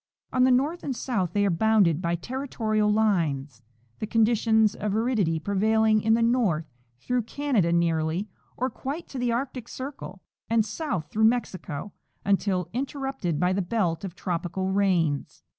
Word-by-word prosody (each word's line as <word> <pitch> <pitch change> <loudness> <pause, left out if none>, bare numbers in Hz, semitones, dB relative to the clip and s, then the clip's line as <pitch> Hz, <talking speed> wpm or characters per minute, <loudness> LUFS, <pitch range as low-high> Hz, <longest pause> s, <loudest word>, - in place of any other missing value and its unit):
On 255 0 +4
the - - +4
north 290 +7 +1
and 270 - -2
south 195 -9 -2
they 205 0 +2
are 195 - +2
bounded 190 -3 +3
by 170 -1 0
territorial 215 -1 -1
lines, 155 - 0 0.4
tlie 215 - -3
conditions 220 -1 +3
of 210 -1 -2
aridity 220 -8 +1
prevailing 215 +4 +2
in 220 +1 +3
the 230 - +2
north 225 -10 +2 0.3
through 250 - 0
Canada 235 - 0
nearly 170 +2 +1 0.3
or 255 +1 -1
quite 285 +8 -5
to 265 - -6
the 245 -1 +1
Arctic 250 0 -3
circle, 255 -9 -8 0.3
and 225 -1 +3
south 215 - -3
through 220 +1 +3
Mexico 205 -7 -1 0.3
until 195 -3 +1
interrupted 270 - -2
by 180 +1 +2
the 195 - 0
belt 180 -3 -1
of 185 -3 -6
tropical 185 +1 -2
rains. 180 -7 0
210 Hz, 155 wpm, -26 LUFS, 180-240 Hz, 0.4 s, On